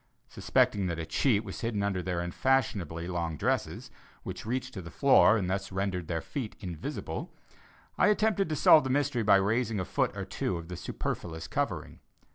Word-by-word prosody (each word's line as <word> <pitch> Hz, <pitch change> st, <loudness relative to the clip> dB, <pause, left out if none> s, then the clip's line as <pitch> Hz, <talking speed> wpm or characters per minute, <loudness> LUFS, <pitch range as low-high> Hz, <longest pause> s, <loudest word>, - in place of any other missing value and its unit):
Suspecting 100 Hz, -3 st, +1 dB
that 85 Hz, -2 st, -2 dB
a 85 Hz, -, -4 dB
cheat 105 Hz, -, +2 dB
was 95 Hz, -3 st, -7 dB
hidden 110 Hz, -3 st, -1 dB
under 100 Hz, -2 st, 0 dB
their 90 Hz, -1 st, -2 dB
unfashionably 90 Hz, -, 0 dB
long 85 Hz, -3 st, -2 dB
dresses, -, -, -2 dB, 0.3 s
which -, -, -7 dB
reached 130 Hz, +2 st, -2 dB
to 95 Hz, -, -6 dB
the 85 Hz, -, -9 dB
floor 135 Hz, -3 st, +5 dB
and 95 Hz, -4 st, -1 dB
thus 95 Hz, +1 st, -2 dB
rendered 95 Hz, -3 st, -2 dB
their 80 Hz, -2 st, -2 dB
feet 125 Hz, -, -5 dB
invisible, 85 Hz, -5 st, -5 dB, 0.7 s
I -, -, +5 dB
attempted 210 Hz, -3 st, +2 dB
to 155 Hz, -, -1 dB
solve 150 Hz, +1 st, +7 dB
the 130 Hz, -, -3 dB
mystery 140 Hz, -2 st, +1 dB
by 105 Hz, -2 st, +5 dB
raising 110 Hz, +2 st, +1 dB
a 95 Hz, -, -2 dB
foot -, -, -1 dB
or -, -, -3 dB
two 90 Hz, -, -2 dB
of 85 Hz, 0 st, -9 dB
the 90 Hz, -, -5 dB
superfluous 80 Hz, 0 st, -5 dB
covering. -, -, -3 dB
100 Hz, 185 wpm, -29 LUFS, 90-125 Hz, 0.7 s, solve